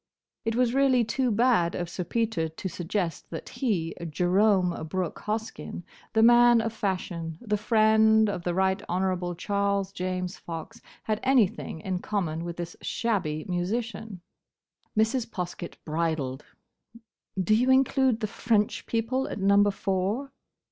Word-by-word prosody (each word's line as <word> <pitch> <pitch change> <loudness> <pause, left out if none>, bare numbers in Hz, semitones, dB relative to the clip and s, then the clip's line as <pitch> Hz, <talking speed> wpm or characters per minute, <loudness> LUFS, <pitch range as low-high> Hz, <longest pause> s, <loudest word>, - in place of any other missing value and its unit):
It 225 0 0
was 245 -1 +2
really 265 -2 +4
too 250 +3 0
bad 225 -6 +3
of 175 - -3
Sir 180 +2 -4
Peter 215 -5 -1
to 160 +5 -6
suggest 175 -1 -3
that 165 - -7
he, 185 - -1 0.2
Jerome 185 +3 +3 0.2
Brooke 180 0 -3
Hoskyn, 220 -4 -4 0.3
the 220 0 +4
Man 240 0 +7
of 225 0 -2
Fashion, 180 -6 -3
the 210 -3 -1
friend 220 0 +4
of 195 -4 -3
the 175 0 -1
Right 190 +1 +1
Honourable 180 -1 -1
Charles 200 0 0
James 185 0 -3
Fox, 170 +8 -8 0.2
had 215 -1 -1
anything 235 -10 +1
in 185 0 -2
common 170 -6 -2
with 170 0 -5
this 175 0 -5
shabby 170 -10 -1
musician. 200 +2 -3 0.8
Mrs. 225 +2 +2
Poskett 180 -4 -5
bridled. 155 -4 -2 0.9
"Do 190 +3 +2
you 245 +4 +3
include 260 -2 +3
the - - +1
French 215 0 0
people 235 +4 0
at - - -5
Number 200 +1 +4
Four?" 200 +7 -1
200 Hz, 140 wpm, -27 LUFS, 175-225 Hz, 0.9 s, Man